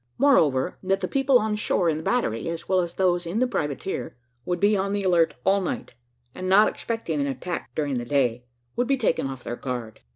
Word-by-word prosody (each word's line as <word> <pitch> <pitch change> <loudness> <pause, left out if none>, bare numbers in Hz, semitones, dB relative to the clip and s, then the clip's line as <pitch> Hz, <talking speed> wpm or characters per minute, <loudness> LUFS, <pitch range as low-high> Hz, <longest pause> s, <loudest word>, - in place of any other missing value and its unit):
Moreover, 165 - +3
that 195 0 0
the - - -1
people 270 -1 +3
on 215 -2 0
shore 195 -4 +1
in 155 -2 +1
the - - -5
battery, 165 - 0
as 165 0 -5
well 190 -1 +3
as 175 -1 -2
those 175 -2 +1
in 175 +6 -3
the 255 - +3
privateer, 150 - -3 0.3
would 175 -1 -1
be 205 +2 +4
on 195 0 -1
the 205 -1 -1
alert 170 -4 +3
all 195 +1 +3
night, 180 - -4 0.4
and 185 0 -4
not 200 +3 +6
expecting 200 -10 -3
an 140 - 0
attack 140 +7 -4
during 145 -2 -1
the 120 - -5
day, 125 -2 0 0.3
would 245 - 0
be 275 +1 +2
taken 215 - 0
off 130 -2 -7
their 120 - -4
guard. 120 -4 -5
175 Hz, 220 wpm, -25 LUFS, 140-205 Hz, 0.4 s, not